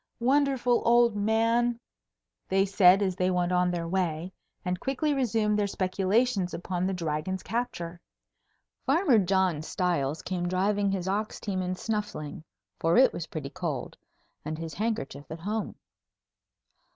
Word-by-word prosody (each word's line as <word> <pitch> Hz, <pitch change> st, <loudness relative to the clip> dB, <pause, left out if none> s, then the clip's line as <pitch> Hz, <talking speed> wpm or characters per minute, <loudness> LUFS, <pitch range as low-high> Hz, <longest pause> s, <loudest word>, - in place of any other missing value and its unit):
"Wonderful 260 Hz, -1 st, +2 dB
old 235 Hz, -1 st, +4 dB
man," 230 Hz, +3 st, +2 dB, 0.7 s
they 195 Hz, +1 st, +3 dB
said 195 Hz, 0 st, +5 dB
as 190 Hz, -2 st, 0 dB
they 185 Hz, 0 st, +1 dB
went 180 Hz, -1 st, +1 dB
on 180 Hz, 0 st, +3 dB
their 170 Hz, -1 st, -2 dB
way, 175 Hz, -1 st, -1 dB, 0.3 s
and 180 Hz, 0 st, -1 dB
quickly 280 Hz, +3 st, 0 dB
resumed 225 Hz, -5 st, +1 dB
their 205 Hz, -, +1 dB
speculations 195 Hz, +1 st, 0 dB
upon 180 Hz, +1 st, -2 dB
the 195 Hz, -, -1 dB
Dragon's 170 Hz, +2 st, -3 dB
capture. 180 Hz, -7 st, -4 dB, 0.8 s
Farmer 280 Hz, -, +4 dB
John 190 Hz, -4 st, +1 dB
Stiles 160 Hz, -4 st, -1 dB
came 180 Hz, -1 st, -2 dB
driving 200 Hz, +3 st, +1 dB
his 190 Hz, -2 st, -2 dB
ox 210 Hz, +3 st, -2 dB
team 190 Hz, -3 st, -2 dB
and 185 Hz, 0 st, -2 dB
snuffling, 205 Hz, -10 st, -4 dB, 0.4 s
for 165 Hz, +4 st, +2 dB
it 260 Hz, -, +6 dB
was 170 Hz, -, -5 dB
pretty 145 Hz, -4 st, -6 dB
cold, 165 Hz, -8 st, -4 dB, 0.5 s
and 155 Hz, +1 st, -4 dB
his 165 Hz, 0 st, -6 dB
handkerchief 145 Hz, -10 st, -3 dB
at 160 Hz, +1 st, -7 dB
home. 210 Hz, +4 st, -3 dB
190 Hz, 140 wpm, -28 LUFS, 175-220 Hz, 0.8 s, it